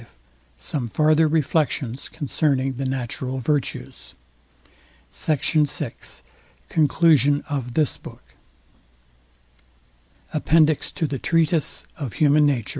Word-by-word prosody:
V - - -16 0.5
SOME 120 - -3
FARTHER 155 +6 +3
REFLECTIONS 150 -4 -1
CONCERNING 135 -2 -1
THE 135 - -3
NATURAL 130 0 -3
VIRTUES 120 - -3 1.0
SECT. 155 -4 -1 0.2
VI 140 -5 -4 0.8
CONCLUSION 150 -2 +3
OF 130 -5 -4
THIS 155 -3 +1
BOOK - - -14 2.0
APPENDIX 155 0 +2
TO 160 - -1
THE 140 -3 -3
TREATISE 165 -2 +1
OF 135 -8 -5
HUMAN 150 0 +4
NATURE 125 -7 0
VOL. - - -7
145 Hz, 105 wpm, -23 LUFS, 130-155 Hz, 2.0 s, HUMAN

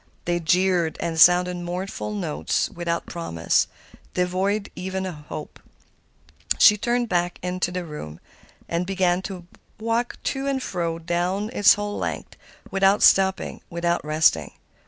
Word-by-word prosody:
They 175 0 0
jeered 175 0 +2
and 165 -1 -2
sounded 180 +1 +6
mournful 175 - -4
notes 80 -5 -1
without 170 -1 -3
promise, 85 - 0 0.5
devoid 190 +3 0
even 190 +1 -3
of 185 - -4 0.2
hope. 150 - -7 1.0
She 210 - +7
turned 240 +3 0
back 175 -2 0
into 180 0 -1
the 180 -1 -4
room 80 - -8 0.5
and 170 +2 -2
began 185 -2 +1
to 190 -2 -7 0.3
walk 230 +2 -1
to 270 0 -2
and 275 -1 0
fro 170 -8 -3
down 180 +5 -1
its 205 -5 +6
whole 205 0 -4
length - - -4 0.4
without 195 +1 +3
stopping, 190 0 +3
without 170 0 -1
resting. 155 - +2
180 Hz, 135 wpm, -24 LUFS, 170-195 Hz, 1.0 s, She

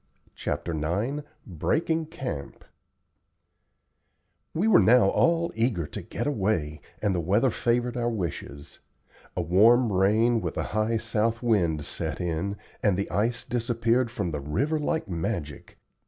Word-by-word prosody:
CHAPTER 85 - -3
IX 100 - -1 0.2
"BREAKING 155 - -1
CAMP" 130 - -6 1.9
We 185 +7 0
were 210 -5 +7
now 115 -4 +5
all 170 0 +2
eager 110 -7 0
to - - -7
get - - -5
away, 95 - -1 0.2
and 100 -2 +2
the 90 - 0
weather 105 +10 +2
favored 120 +1 0
our 120 -1 0
wishes. 80 -7 -5 0.6
A 90 - +1
warm 110 +7 +5
rain 110 +5 +3
with - - -4
a - - 0
high 110 +2 +1
south 115 +2 -1
wind 85 -10 +1
set - - -4
in, 90 +4 -2 0.2
and 100 -4 +2
the 100 - -3
ice 115 +4 0
disappeared 120 0 +1
from 90 -7 -3
the 75 -2 -3
river 140 - 0
like 160 +2 -1
magic. 85 -4 -4
110 Hz, 140 wpm, -26 LUFS, 85-120 Hz, 1.9 s, were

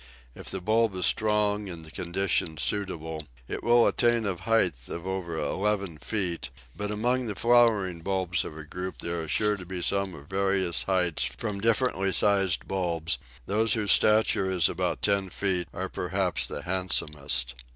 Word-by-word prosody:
If - - -9
the - - -4
bulb 110 +1 +2
is 90 - +1
strong 105 -1 +2
and 85 -3 -8
the 80 - -12
conditions 85 -3 0
suitable, 80 -7 -1 0.2
it - - -5
will 120 0 +5
attain 120 -2 +2
a 100 - 0
height 85 - 0
of 85 +1 -6
over 95 -3 -3
eleven 95 +2 -1
feet, 85 -6 -2 0.3
but 105 +3 -4
among 120 +4 0
the 105 - -4
flowering 110 -7 +3
bulbs 95 -1 0
of 75 - -8
a 80 - -7
group 90 +4 -5
there 85 0 -3
are 80 - -6
sure 105 +5 +2
to 95 - -8
be 90 0 -5
some 100 -2 0
of 70 -2 -12
various 95 -1 0
heights 90 -4 0
from 105 -3 -4
differently 115 -4 +2
sized 95 -2 +2
bulbs; 85 -4 -1 0.3
those 110 - +2
whose 105 -4 +2
stature 105 -3 +4
is 90 -4 +3
about 90 +1 -2
ten 100 -2 +2
feet 90 -2 0
are 95 +1 -4
perhaps 90 0 -1
the 75 - -6
handsomest. 75 -8 0
95 Hz, 170 wpm, -27 LUFS, 85-105 Hz, 0.3 s, will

